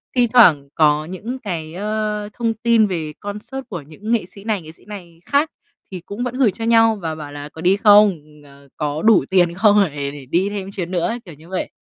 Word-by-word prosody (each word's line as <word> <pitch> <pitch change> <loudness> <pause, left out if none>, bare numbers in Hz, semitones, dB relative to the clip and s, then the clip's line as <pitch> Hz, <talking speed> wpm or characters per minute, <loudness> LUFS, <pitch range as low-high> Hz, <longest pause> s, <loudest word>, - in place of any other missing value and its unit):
thi 245 -1 +4
thoảng 160 - +6
có 150 -1 +3
những 210 +9 -6
cái, 165 -8 -5
ơ, 210 +1 -3
thông 230 -2 -1
tin 225 -1 +3
về 160 -5 -4
concert 210 +6 -6
của 175 -6 -5
những 180 +10 -8
nghệ 230 -6 +1
sĩ 195 +2 -14
này, 215 -4 -1
nghệ 155 - -11
sĩ 165 - -19
này 175 -5 -10
khác 290 +3 +1 0.4
thì 185 -2 -6
cũng 215 +5 -5
vẫn 250 0 -4
gửi 250 -7 +4
cho 225 +4 -6
nhau 225 -1 +4
và 160 -2 -3
bảo 150 -2 -8
là 145 0 -8
"Có 160 - -11
đi 185 +3 +3
không? 205 -4 +6 0.2
Ờ, 140 0 -18
có 150 0 -2
đủ 220 -1 +4
tiền 175 -3 +3
không? 205 +2 +4
Để 140 -3 -4
để 145 -2 -10
đi 180 +9 0
thêm 195 -1 -5
chuyến 185 -4 -5
nữa 175 -2 0
ấy", 235 +2 -3
kiểu 170 - -11
như 160 +4 -17
vậy. 190 - -3
195 Hz, 235 wpm, -20 LUFS, 160-220 Hz, 0.4 s, thoảng